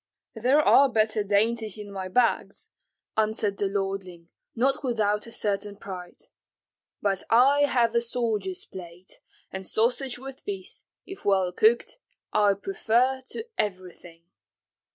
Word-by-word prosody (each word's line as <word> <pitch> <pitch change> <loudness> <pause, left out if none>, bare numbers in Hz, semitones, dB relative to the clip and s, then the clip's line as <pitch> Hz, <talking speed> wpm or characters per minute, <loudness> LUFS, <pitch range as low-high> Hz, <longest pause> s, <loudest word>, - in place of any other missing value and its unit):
"There 250 +6 +3
are 280 -2 +6
better 215 -2 +1
dainties 215 +1 0
in 205 -1 -8
my 190 -1 -5
bags," 235 +6 0 0.4
answered 215 -2 +1
the 200 - +1
lordling, 195 -3 -4 0.3
not 270 +5 +1
without 215 -4 0
a - - -10
certain 205 -1 -2
pride; 185 -3 -9 0.8
"but 195 -2 +1
I 275 +5 +5
have 235 -4 +2
a 235 - +3
soldier's 220 -6 -2
palate, 180 0 -11 0.3
and 190 0 -6
sausage 245 +3 0
with 270 +1 -10
peas, 195 -2 -7 0.2
if 385 - -10
well 190 -3 +2
cooked, 225 - +2 0.3
I 205 -1 +4
prefer 255 - +1
to 455 - -5
everything." 180 -4 -4
210 Hz, 130 wpm, -26 LUFS, 195-240 Hz, 0.8 s, are